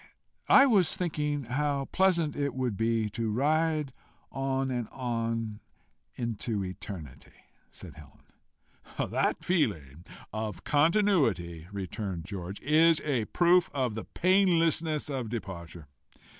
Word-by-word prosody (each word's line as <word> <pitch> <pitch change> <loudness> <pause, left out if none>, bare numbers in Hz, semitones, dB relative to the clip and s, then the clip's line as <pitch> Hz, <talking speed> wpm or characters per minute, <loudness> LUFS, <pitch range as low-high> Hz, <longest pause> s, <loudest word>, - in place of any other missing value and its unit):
I 275 - +8
was 195 - +3
thinking 150 -5 -1
how 140 +3 -1
pleasant 170 -5 +2
it 140 -2 -2
would 125 -5 -1
be 115 0 +1
to 115 +1 -2
ride 150 +3 +1 0.4
on 135 0 -1
and 120 -3 -2
on 115 -3 -3 0.6
into 115 -4 -2
eternity," 90 -6 -9 0.3
said - - -12
Helen. 75 -4 -10
"That - - 0
feeling 90 - -1 0.3
of 110 -5 -4
continuity," 145 - +2
returned 95 -2 -5
George, 95 -1 -6
"is 160 +3 +4
a 130 -7 0
proof 175 - +3
of 130 -5 0
the 110 - -6
painlessness 165 -4 +2
of 130 -6 -3
departure. 85 -8 -7
130 Hz, 115 wpm, -29 LUFS, 105-155 Hz, 0.6 s, I